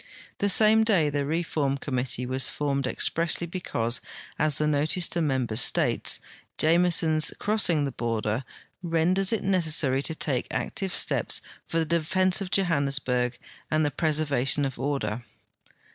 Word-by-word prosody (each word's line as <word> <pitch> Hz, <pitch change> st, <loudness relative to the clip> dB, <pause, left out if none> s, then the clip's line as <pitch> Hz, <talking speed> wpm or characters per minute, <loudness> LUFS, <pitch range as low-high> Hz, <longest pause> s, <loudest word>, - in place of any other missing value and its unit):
The 205 Hz, -, +1 dB
same 220 Hz, +2 st, +5 dB
day 180 Hz, -10 st, +2 dB
the 140 Hz, -1 st, -2 dB
reform 155 Hz, -3 st, -1 dB
committee 130 Hz, -2 st, -3 dB
was 130 Hz, +1 st, -1 dB
formed 140 Hz, -2 st, -2 dB
expressly 165 Hz, +5 st, +1 dB
because, 125 Hz, -10 st, -3 dB, 0.4 s
as 150 Hz, -2 st, +2 dB
the 150 Hz, -, 0 dB
notice 150 Hz, +4 st, +2 dB
to 170 Hz, -, -2 dB
members 130 Hz, -6 st, 0 dB
states, -, -, +2 dB, 0.4 s
Jameson's 165 Hz, -1 st, +3 dB
crossing 190 Hz, -8 st, +1 dB
the 140 Hz, -, -3 dB
border 115 Hz, 0 st, -3 dB, 0.2 s
'' -, -, -45 dB, 0.2 s
renders 185 Hz, +4 st, +2 dB
it 225 Hz, -, -1 dB
necessary 160 Hz, -8 st, +2 dB
to 160 Hz, +3 st, -2 dB
take 135 Hz, -5 st, -1 dB
active 195 Hz, -2 st, -3 dB
steps -, -, +1 dB, 0.3 s
for 165 Hz, -, -3 dB
the 165 Hz, -, +1 dB
defense 180 Hz, +4 st, +1 dB
of 190 Hz, -, -4 dB
Johannesburg 140 Hz, -9 st, 0 dB, 0.3 s
and 155 Hz, 0 st, +1 dB
the 145 Hz, -, -1 dB
jireservation 145 Hz, -2 st, +1 dB
of 130 Hz, -3 st, -6 dB
order." 130 Hz, -5 st, -3 dB
150 Hz, 145 wpm, -25 LUFS, 135-170 Hz, 0.4 s, same